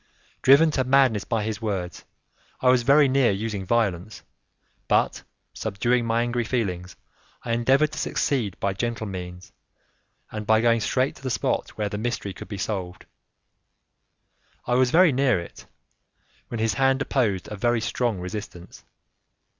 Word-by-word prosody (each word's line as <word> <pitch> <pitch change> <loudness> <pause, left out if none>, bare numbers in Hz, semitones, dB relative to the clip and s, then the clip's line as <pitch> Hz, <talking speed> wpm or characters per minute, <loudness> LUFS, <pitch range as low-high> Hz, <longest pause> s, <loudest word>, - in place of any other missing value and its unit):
Driven 145 +4 +6
to 135 -3 0
madness 130 -5 +3
by 115 -2 -1
his 110 +1 -4
words, 95 -5 -4 0.5
I 125 - +3
was 125 -1 +4
very 140 +4 +5
near 130 -2 +3
using 100 0 -2
violence, 110 -3 -1 0.6
but - - +1 0.3
subduing 120 +4 0
my 115 +1 +1
angry 120 0 -1
feelings, 95 -7 -3 0.5
I 115 - -3
endeavored 135 +6 +2
to 155 - -6
succeed 115 -10 -1
by 100 -1 -1
gentle 115 +2 -3
means 90 -2 -8 0.8
and 105 -1 -6
by 110 0 +5
going 115 0 +3
straight 130 +4 0
to - - -16
the 130 - -3
spot - - -2
where 105 -1 -1
the 105 0 -5
mystery 110 -4 -3
could - - -10
be 100 - -6
solved. 95 -3 -4 1.6
I 120 - -1
was 125 0 +3
very 170 +3 +5
near 130 -6 +2
it, 85 - -11 0.8
when 120 - -5
his 110 -1 +1
hand 135 +2 +2
opposed 110 -10 -1
a - - -4
very 120 +3 +1
strong 115 -2 -1
resistance. 90 -2 -8
115 Hz, 155 wpm, -24 LUFS, 100-130 Hz, 1.6 s, Driven